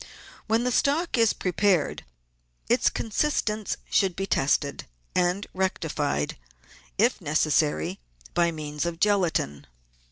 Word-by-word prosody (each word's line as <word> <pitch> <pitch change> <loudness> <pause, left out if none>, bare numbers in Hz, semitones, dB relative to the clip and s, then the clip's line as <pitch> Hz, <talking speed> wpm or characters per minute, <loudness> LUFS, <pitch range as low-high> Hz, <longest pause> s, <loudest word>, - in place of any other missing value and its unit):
When 225 +2 +2
the 250 - 0
stock 290 +7 +1
is 230 -3 +4
prepared 185 -2 +1 0.6
its - - +3
consistence 220 -3 -1
should 190 -3 +2
be 195 - -2
tested, 140 -4 0 0.3
and 180 +2 +1
rectified, 155 - -1 0.6
if - - +2
necessary, 75 -1 +1 0.3
by 170 -1 +3
means 150 0 -4
of 170 -1 -4
gelatine. 175 - +1
180 Hz, 105 wpm, -26 LUFS, 150-210 Hz, 0.6 s, is